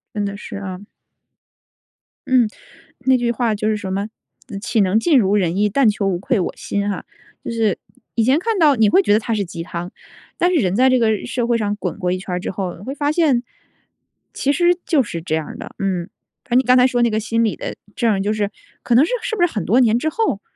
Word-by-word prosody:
真 205 Hz, -1 st, -1 dB
的 200 Hz, 0 st, -4 dB
是 210 Hz, 0 st, -8 dB
啊。 200 Hz, 0 st, -7 dB, 1.4 s
嗯， 255 Hz, -3 st, +4 dB, 0.5 s
那 260 Hz, 0 st, +3 dB
句 240 Hz, -1 st, 0 dB
话 230 Hz, -1 st, 0 dB
就 210 Hz, +1 st, -1 dB
是 215 Hz, -, +1 dB
什 195 Hz, -3 st, -5 dB
么， 200 Hz, +2 st, -2 dB, 0.5 s
岂 230 Hz, -, 0 dB
能 195 Hz, +2 st, +3 dB
尽 295 Hz, +3 st, +4 dB
如 200 Hz, -3 st, +2 dB
人 180 Hz, -4 st, +1 dB
意， 210 Hz, +1 st, +2 dB
但 240 Hz, +4 st, +3 dB
求 205 Hz, -1 st, -2 dB
无 185 Hz, -3 st, 0 dB
愧 205 Hz, +5 st, 0 dB
我 185 Hz, -, -2 dB
心 200 Hz, 0 st, -2 dB
哈。 200 Hz, -, -3 dB, 0.4 s
就 -, -, -4 dB
是 225 Hz, -4 st, 0 dB, 0.4 s
以 230 Hz, -, +2 dB
前 260 Hz, +6 st, +3 dB
看 445 Hz, +4 st, -1 dB
到 295 Hz, -4 st, +5 dB
你 220 Hz, -2 st, +4 dB
会 380 Hz, -, +5 dB
觉 205 Hz, -, +2 dB
得 210 Hz, -, +5 dB
它 225 Hz, +1 st, -2 dB
是 205 Hz, -2 st, -1 dB
鸡 170 Hz, -1 st, -7 dB
汤， 170 Hz, +1 st, -6 dB, 0.5 s
但 355 Hz, -, +3 dB
是 -, -, +3 dB
人 185 Hz, -2 st, 0 dB
在 260 Hz, +3 st, +5 dB
这 255 Hz, -1 st, +3 dB
个 220 Hz, -3 st, +1 dB
社 245 Hz, -1 st, -1 dB
会 235 Hz, -, +2 dB
上 210 Hz, -2 st, -1 dB
滚 205 Hz, -, -4 dB
过 180 Hz, -2 st, -1 dB
一 185 Hz, -, -1 dB
圈 185 Hz, 0 st, -7 dB
儿 -, -, -3 dB
之 -, -, -4 dB
后 185 Hz, -2 st, -4 dB
你 195 Hz, -, -12 dB
会 270 Hz, -, -5 dB
发 290 Hz, 0 st, 0 dB
现， 305 Hz, -7 st, +2 dB, 0.9 s
其 280 Hz, -, 0 dB
实 350 Hz, +2 st, +3 dB
就 305 Hz, -6 st, +3 dB
是 170 Hz, -7 st, -5 dB
这 160 Hz, -1 st, -3 dB
样 160 Hz, -1 st, -1 dB
儿 -, -, -8 dB
的。 -, -, -9 dB
嗯， 185 Hz, -3 st, -1 dB, 0.4 s
反 -, -, -30 dB
正 245 Hz, +2 st, +5 dB
你 -, -, 0 dB
刚 250 Hz, 0 st, +4 dB
才 250 Hz, 0 st, +6 dB
说 245 Hz, -1 st, +1 dB
那 235 Hz, -, +3 dB
个 215 Hz, -, 0 dB
心 230 Hz, +1 st, 0 dB
理 220 Hz, -3 st, 0 dB
的 -, -, -5 dB, 0.2 s
证 235 Hz, -, +1 dB
儿 195 Hz, -, 0 dB
就 205 Hz, +2 st, 0 dB
是 210 Hz, -2 st, -1 dB, 0.3 s
可 240 Hz, -, +1 dB
能 255 Hz, +5 st, +6 dB
是， -, -, -3 dB
是 -, -, -2 dB
不 400 Hz, -, -1 dB
是 350 Hz, -, 0 dB
很 210 Hz, -, -2 dB
多 240 Hz, +6 st, +3 dB
年 235 Hz, -2 st, +4 dB
之 310 Hz, -, -1 dB
后， 355 Hz, -, -1 dB
220 Hz, 275 characters per minute, -20 LUFS, 200-255 Hz, 1.4 s, 才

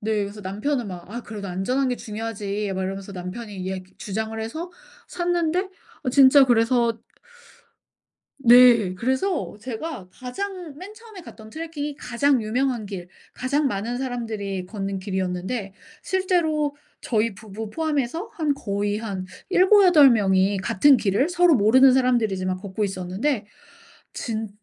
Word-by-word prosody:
네. 215 Hz, -1 st, 0 dB
그래서 200 Hz, +1 st, -6 dB
남편은 220 Hz, +7 st, -2 dB
막 180 Hz, -1 st, -9 dB
"아 240 Hz, +3 st, -5 dB
그래도 205 Hz, -3 st, -7 dB
안전한 250 Hz, +10 st, 0 dB
게 250 Hz, -, -1 dB
중요하지." 210 Hz, -2 st, -4 dB
막 190 Hz, -, -2 dB
이러면서 195 Hz, +1 st, -5 dB
남편이 195 Hz, +4 st, -7 dB
이야기 185 Hz, 0 st, -5 dB
주장을 220 Hz, +2 st, -4 dB
해서 320 Hz, +11 st, -5 dB, 0.4 s
샀는데 350 Hz, +1 st, 0 dB, 0.4 s
어 255 Hz, -, 0 dB
진짜 275 Hz, +1 st, +7 dB
그래서 235 Hz, -1 st, +2 dB, 1.4 s
네. 240 Hz, -6 st, +6 dB
그래서 265 Hz, -, -1 dB
제가 240 Hz, -, -6 dB
가장 350 Hz, -, -6 dB
맨 385 Hz, +6 st, -9 dB
처음에 435 Hz, -3 st, -13 dB
갔던 220 Hz, -8 st, -13 dB
트래킹이 300 Hz, 0 st, -5 dB
가장 260 Hz, -1 st, +1 dB
유명한 245 Hz, +1 st, -1 dB
길 190 Hz, -3 st, -7 dB, 0.2 s
가장 280 Hz, +3 st, 0 dB
많은 225 Hz, +3 st, -3 dB
사람들이 220 Hz, -7 st, -4 dB
걷는 195 Hz, 0 st, -4 dB
길이었는데 190 Hz, +2 st, -3 dB, 0.3 s
실제로 320 Hz, -6 st, 0 dB, 0.2 s
저희 225 Hz, -2 st, 0 dB
부부 210 Hz, 0 st, -8 dB
포함해서 315 Hz, -, -2 dB
한 310 Hz, -3 st, 0 dB
거의 205 Hz, -3 st, -2 dB
한 195 Hz, -4 st, -5 dB, 0.2 s
7-8 365 Hz, -7 st, +6 dB
명이 195 Hz, -3 st, +2 dB
같은 260 Hz, +8 st, +4 dB
길을 215 Hz, -, +1 dB
서로 355 Hz, -2 st, +4 dB
모르는 255 Hz, +5 st, +6 dB
사람들이지만 220 Hz, -8 st, +1 dB
걷고 200 Hz, +2 st, -3 dB
있었는데. 200 Hz, +6 st, -2 dB, 0.7 s
진 220 Hz, -2 st, -3 dB
230 Hz, 300 characters per minute, -23 LUFS, 200-285 Hz, 1.4 s, 진짜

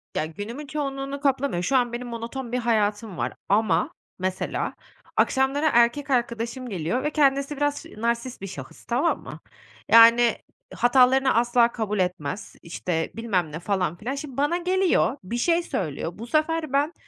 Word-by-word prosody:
Ya, -, -, 0 dB
günümün 220 Hz, -, -7 dB
çoğunluğunu 275 Hz, -2 st, -4 dB
kaplamıyor. 265 Hz, -10 st, 0 dB
Şu 265 Hz, +7 st, +2 dB
an 240 Hz, -1 st, +1 dB
benim 245 Hz, +1 st, -4 dB
monoton 235 Hz, +2 st, -6 dB
bir 250 Hz, -, 0 dB
hayatım 215 Hz, -4 st, 0 dB
var -, -, -2 dB, 0.2 s
ama, 200 Hz, -5 st, +2 dB, 0.3 s
mesela, 185 Hz, 0 st, -2 dB, 0.4 s
akşamları 275 Hz, +3 st, +2 dB
erkek 240 Hz, +4 st, +3 dB
arkadaşım 240 Hz, 0 st, -1 dB
geliyor 185 Hz, +5 st, -2 dB
ve 300 Hz, -, +1 dB
kendisi 280 Hz, -1 st, +2 dB
biraz 290 Hz, 0 st, -1 dB
ş -, -, -14 dB
narsist 235 Hz, 0 st, -2 dB
bir 195 Hz, -, -5 dB
şahıs, 135 Hz, -7 st, -10 dB
tamam 260 Hz, +8 st, 0 dB
mı? -, -, -9 dB, 0.5 s
Yani, 230 Hz, 0 st, +7 dB, 0.4 s
hatalarını 260 Hz, +2 st, +4 dB
asla 235 Hz, 0 st, +3 dB
kabul 210 Hz, -3 st, -2 dB
etmez, 180 Hz, 0 st, -3 dB
işte, 165 Hz, -1 st, -3 dB
bilmem 190 Hz, -9 st, -1 dB
ne, 160 Hz, -, -5 dB
falan 180 Hz, -3 st, -1 dB
filan. 250 Hz, +8 st, -4 dB
Şimdi 275 Hz, -3 st, -7 dB
bana 295 Hz, +5 st, +1 dB
geliyor, 365 Hz, -5 st, +2 dB
bir 235 Hz, +6 st, -4 dB
şey 340 Hz, +6 st, +2 dB
söylüyor. 165 Hz, -, -3 dB
Bu 230 Hz, +3 st, -8 dB
sefer 310 Hz, 0 st, 0 dB
ben, 290 Hz, +4 st, +2 dB
240 Hz, 160 wpm, -25 LUFS, 205-275 Hz, 0.5 s, Yani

